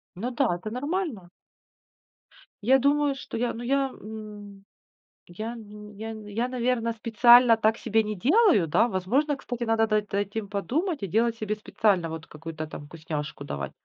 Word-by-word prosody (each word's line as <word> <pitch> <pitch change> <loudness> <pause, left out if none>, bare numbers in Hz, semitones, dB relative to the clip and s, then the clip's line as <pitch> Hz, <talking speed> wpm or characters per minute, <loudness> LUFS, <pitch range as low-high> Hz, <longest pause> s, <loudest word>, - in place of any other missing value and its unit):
Ну 225 +8 -3
да, 235 -8 +1
это 215 +5 -7
нормально. 275 - -3 1.3
Я 265 +5 +5
думаю, 285 +1 +2
что 270 - -7
я, 240 +1 0
ну, 230 - -7
я, 270 +1 0
ну, 210 -1 -9 0.8
я, 215 +6 -5
н 210 0 -9
я, 230 +4 -1
наверно, 245 -2 0
специально 235 +1 +6
так 220 0 +1
себе 225 -1 +1
не 210 0 -4
делаю, 295 - +4
да. 220 +10 +3
Возможно, 245 +10 0
кстати, 245 -2 -5
надо 225 -1 +2
над 210 -2 -1
этим 205 +1 -2
подумать 285 - -2
и - - -1
делать 230 +5 +1
себе 215 -1 -2
специально 200 -5 +1
вот 160 0 -7
какую-то 155 0 -7
там 145 - -9
вкусняшку 150 -2 -6
давать. 70 - -5
220 Hz, 155 wpm, -26 LUFS, 200-245 Hz, 1.3 s, специально